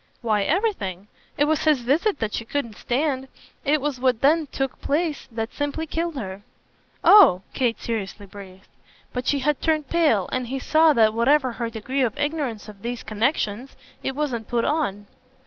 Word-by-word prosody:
"Why 215 -3 +2
everything. 210 - -1 0.3
It 290 - +3
was 315 +1 0
his 300 -5 +4
visit 300 - +1
that 220 -4 -3
she - - -2
couldn't 230 -2 -3
stand 265 +1 -1 0.4
it 300 +1 +2
was 285 -2 -3
what 250 -3 +1
then 310 +2 +3
took 270 0 -4
place 305 0 -1
that 225 0 -4
simply 290 +2 -2
killed 330 +1 -3
her." 195 -6 -6 0.6
"Oh!" 350 - +7
Kate 245 -4 0
seriously 205 -3 -4
breathed. 190 -1 -13 0.5
But 250 +1 -4
she 285 - +2
had 295 +1 0
turned 310 -3 0
pale, 300 - +2
and 255 -1 -2
he 265 +3 -3
saw 310 +4 +4
that, 220 -4 +4
whatever 260 +3 +3
her 235 0 -4
degree 240 +5 -3
of 240 -2 0
ignorance 290 -8 -2
of 205 -2 -12
these 240 +1 -4
connexions, 220 +1 -1 0.3
it 265 - -3
wasn't 255 -7 -2
put 235 -1 0
on. 205 -10 -1
260 Hz, 175 wpm, -23 LUFS, 220-300 Hz, 0.6 s, Oh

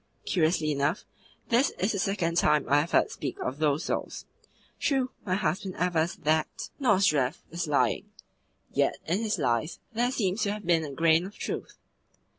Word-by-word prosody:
Curiously 160 -3 +1
enough, 145 +5 0 0.4
this 245 +4 +4
is 195 +4 +1
the 200 - -2
second 180 -3 0
time 150 -4 +3
I 145 +1 +4
have 165 - -4
heard - - +3
speak 135 -4 -5
of 130 +3 -3
those 150 -1 +1
souls. - - -3 0.5
True, 265 -2 +1 0.2
my 185 - +2
husband 190 -1 -1
avers 170 -1 +1
that 155 +1 -1
Nozdrev 185 - +3
was 170 0 -3
lying; 145 -1 +1 0.6
yet - - +2
in 175 +5 0
his 220 -3 0
lies 130 +1 0 0.2
there 240 +2 +1
seems 215 -5 -1
to 200 - +1
have 210 -1 -7
been 170 -2 +3
a 145 - -5
grain 165 +4 +3
of 205 - -13
truth." - - -5
170 Hz, 170 wpm, -28 LUFS, 155-200 Hz, 0.6 s, this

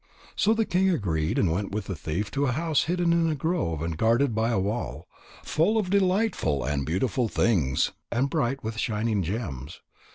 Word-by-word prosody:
So 220 +2 +3
the 225 0 +1
king 190 +1 +2
agreed 80 - 0
and 90 - +2
went 100 +4 -2
with 105 -1 -2
the 95 - -4
thief 85 +7 -3
to 140 0 0
a 125 - +1
house 160 +2 +1
hidden 175 0 +1
in 165 -1 +2
a 155 - 0
grove 140 - -1
and 80 -1 -2
guarded 115 - +2
by 110 +1 +1
a 115 - +1
wall, 105 +5 -3 0.4
full 185 +8 +2
of 195 -4 0
delightful 190 - +1
and 70 -1 -1
beautiful 115 +8 0
things, 85 - +1 0.2
and 125 +3 +1
bright 135 -3 -1
with 110 0 -4
shining 110 -2 0
gems. 85 - -5
115 Hz, 190 wpm, -26 LUFS, -, 0.4 s, So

